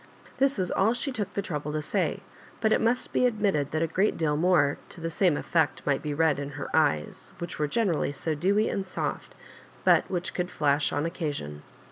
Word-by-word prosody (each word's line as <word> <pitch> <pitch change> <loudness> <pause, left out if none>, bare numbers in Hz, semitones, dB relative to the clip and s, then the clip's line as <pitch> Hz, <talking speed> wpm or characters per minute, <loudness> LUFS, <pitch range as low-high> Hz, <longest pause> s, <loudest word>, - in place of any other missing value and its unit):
This 275 -1 +3
was 185 -2 -1
all 220 +5 +2
she 275 +3 -2
took 215 -6 -3
the 200 - -1
trouble 150 -4 -4
to 155 - -1
say; 190 +3 -1 0.4
but 220 -1 +2
it - - +3
must 235 +2 0
be 250 - +4
admitted 200 - 0
that 155 +1 0
a - - +1
great 190 +6 +1
deal 155 -3 +1
more 160 -3 +3
to - - -5
the 165 0 -3
same 175 -3 +2
effect 160 -5 0
might 140 -2 +1
be 150 - -3
read 155 -1 +2
in 140 0 -5
her 145 - -4
eyes, 75 - 0
which 170 -1 -6
were 150 - +1
generally 170 -4 0
so 155 +3 -2
dewy 200 +8 +2
and 195 -1 -2
soft, - - -4 0.5
but - - +4
which 180 0 -2
could 180 0 -2
flash 145 -2 +1
on 150 - -1
occasion. 145 - -4
165 Hz, 210 wpm, -27 LUFS, 150-195 Hz, 0.5 s, be